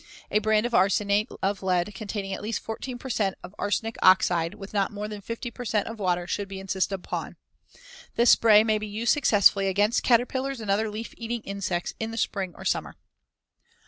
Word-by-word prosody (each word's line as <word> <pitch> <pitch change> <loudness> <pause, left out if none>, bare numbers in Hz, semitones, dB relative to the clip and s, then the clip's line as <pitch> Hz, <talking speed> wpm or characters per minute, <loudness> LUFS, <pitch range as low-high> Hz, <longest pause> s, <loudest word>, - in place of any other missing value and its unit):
A 210 - +3
brand 215 +1 +2
of 240 - -3
arsenate 200 +2 +2
of 195 0 0
lead 185 +1 0
containing 200 -1 -5
at - - -5
least 220 +2 -2
14 245 +3 -6
per 265 - -9
cent 195 -4 0
of 185 - -10
arsenic 220 +2 -1
oxide 175 -3 +4
with 195 +1 -10
not 200 -2 +1
more 210 0 -5
than 210 -1 -7
50 230 +3 -5
per 245 - -8
cent 215 -3 0
of 225 -1 -7
water 180 -3 0
should 200 +3 -3
be 195 0 -7
insisted 195 0 -1
upon. 185 - -5 0.8
This 235 0 +5
spray 215 -2 +6
may 215 -1 +1
be 215 - -5
used 220 +3 +1
successfully 205 -8 +4
against 205 +4 +2
caterpillars 260 +2 +1
and 215 -3 -2
other 215 +2 +1
leaf 215 +2 -6
eating 235 0 -4
insects 195 -4 -3
in 225 - -2
the 225 - -7
spring 190 -6 -2
or - - -10
summer. - - -1
210 Hz, 200 wpm, -26 LUFS, 195-225 Hz, 0.8 s, spray